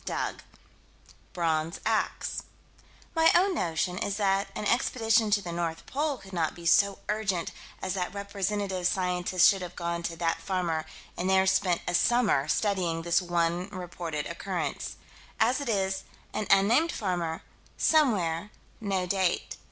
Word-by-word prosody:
Dug. - - -3 0.9
Bronze 165 -1 -1
ax. - - 0 0.7
My 325 0 +5
own 375 +2 +4
notion 180 - -1
is 200 0 -2
that 195 -1 +2
an 210 - -3
expedition 225 -1 +2
to 205 -1 +2
the 175 - -5
North 170 -1 -3
Pole 290 0 -1
could 195 -4 -14
not 165 -3 0
be 170 - -11
so 200 +3 +4
urgent 210 -5 -1 0.3
as 185 - -1
that 180 -2 -2
representative 200 -2 -2
scientists 180 -1 +3
should 195 -2 +3
have 180 -1 -7
gone 170 -1 -2
to 170 0 -3
that 165 0 -1
farmer 170 -3 -1 0.3
and 180 +2 -1
there 190 0 +4
spent 190 -2 +2
a - - 0
summer 205 - +3
studying 175 -2 0
this 170 +2 +3
one 175 +1 0
reported 175 -5 -5
occurrence. 180 +2 -4 0.4
As 255 +5 +3
it 280 - -3
is 190 -3 0 0.3
un 215 - -2 0.2
named 305 +9 +3
farmer 175 -5 -2 0.3
somewhere 205 - +2 0.3
no 195 -4 -1
date. 185 -1 0
185 Hz, 145 wpm, -28 LUFS, 170-205 Hz, 0.9 s, My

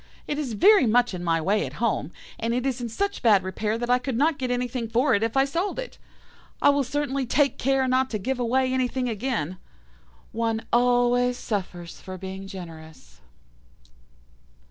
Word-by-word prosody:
It 295 - -3
is 265 -6 -3
very 390 - +6
much 240 0 +3
in 175 -1 -5
my 165 -1 +1
way 195 +6 +1
at - - -6
home, 215 -8 -1 0.3
and 230 +1 -1
it 250 +1 -1
is 260 -2 -1
in 240 - -3
such 400 - -2
bad 210 -6 +5
repair 210 +4 -2
that 240 +1 -3
I 250 - +4
could 255 -2 -3
not 300 +2 +2
get 255 -1 -2
anything 245 -1 -2
for 250 +4 +2
it 205 - +2
if 225 +3 -1
I 270 - +5
sold 340 +8 -2
it. - - -6 0.6
I - - +5
will 285 0 +3
certainly 275 0 -2
take 280 +3 +2
care 270 0 +2
not 260 +1 +2
to 215 - -2
give 250 +5 -3
away 255 +2 +1
anything 255 0 0
again. 210 - -2 0.7
One 225 0 -1
always 245 0 +3
suffers 180 -7 -5
for 185 0 -8
being 190 +1 -7
generous. 160 - -11
245 Hz, 185 wpm, -25 LUFS, 210-265 Hz, 0.7 s, very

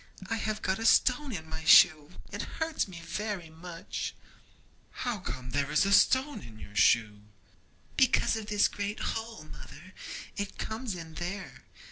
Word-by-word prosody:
I 225 - +1
have 215 -1 -3
got 190 +2 0
a 225 - -3
stone 260 +4 +4
in 160 -7 -6
my 160 0 -6
shoe; 155 -1 +7 0.2
it - - -4 0.2
hurts 320 -6 -1
me 175 -3 -9
very 195 -2 -4
much.' 165 +1 -6 0.9
'How 240 -4 -1
comes 125 -8 -6
there 140 0 +1
to - - -10
be 155 +6 +2
a - - 0
stone 260 +7 +4
in 115 -3 -12
your 105 -1 -12
shoe?' 105 0 +3 0.8
'Because 260 -3 +4
of 220 -2 -5
this 210 -1 +3
great 205 +1 -4
hole, 225 -4 -6
mother; 180 +4 -12 0.4
it 205 -1 -4
comes 220 -2 -4
in 165 -2 -9
there. 180 +4 -6
190 Hz, 165 wpm, -30 LUFS, 160-220 Hz, 0.9 s, shoe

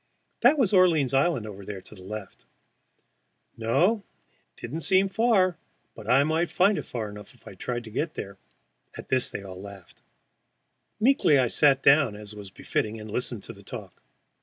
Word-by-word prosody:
That 270 +6 +5
was 220 -7 +2
Orleans 165 -8 +4
Island 135 -4 +2 0.2
there 100 -2 -6
to - - -14
the 100 - -13
left. 100 +1 -8 1.1
No, 140 - +2 0.6
it - - -17
did 120 - -7
not 165 - -3
seem 190 +6 +3
far, 195 -4 +2 0.3
but - - -10
I 135 +2 +5
might 160 +3 0
find 190 -1 +3
it - - -7
far 115 -3 -4
enough 105 +4 -11
if 120 - -20
I - - -9
tried 120 +5 -4
to 110 - -11
get 155 +8 -2
there. 100 -1 -7 0.6
At - - -10
this 130 -1 +1
they 100 - -6
all 95 -1 -9
laughed. 100 -2 -12 1.0
Meekly 220 - +4
I 125 -3 +2
sat 135 0 +4
down, 140 -6 +5
as 105 0 -9
was 105 -2 -9
befitting, 110 +3 -3
and 110 0 -9
listened 120 -2 -3
to 115 - -8
the 100 - -15
talk. 100 - -10
125 Hz, 185 wpm, -26 LUFS, 105-175 Hz, 1.1 s, That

